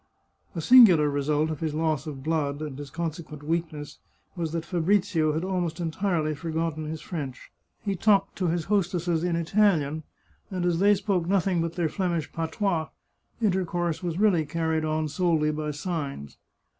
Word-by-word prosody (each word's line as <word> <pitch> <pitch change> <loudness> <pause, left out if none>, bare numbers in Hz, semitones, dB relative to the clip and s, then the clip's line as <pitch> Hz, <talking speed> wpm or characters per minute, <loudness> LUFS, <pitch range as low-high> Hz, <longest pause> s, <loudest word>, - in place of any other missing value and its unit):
A 165 - -2
singular 180 - +7
result 150 +2 0
of 155 - -5
his 155 -2 -2
loss 155 -2 0
of 135 -3 -6
blood, 150 -2 -1
and 150 -3 -6
his 145 -1 -7
conse 165 +2 -3
quent 150 -1 -11
weakness, 155 -2 -3 0.4
was 165 -3 -3
that 165 0 -3
Fabrizio 175 -3 +1
had 160 +3 -1
almost 180 -4 -2
entirely 165 -2 0
for 150 +3 -6
gotten 160 -1 -2
his 155 0 -5
French. 145 -7 -6 0.3
He 200 -2 -1
talked 195 0 +2
to 185 - 0
his 165 -1 -1
hostesses 175 -4 0
in 175 -1 0
Italian, 165 -4 +2 0.5
and 185 -3 -2
as 170 -1 +1
they 205 +2 +5
spoke 195 -4 -1
nothing 190 -2 +2
but 165 0 -2
their 170 -2 0
Flemish 170 -3 -2
patois, 165 0 -1 0.6
intercourse 175 -4 0
was 175 -2 -3
really 200 -6 +4
carried 160 +1 -1
on 155 0 0
solely 155 -1 +1
by 150 0 -3
signs. 150 - -4
165 Hz, 170 wpm, -26 LUFS, 155-180 Hz, 0.6 s, singular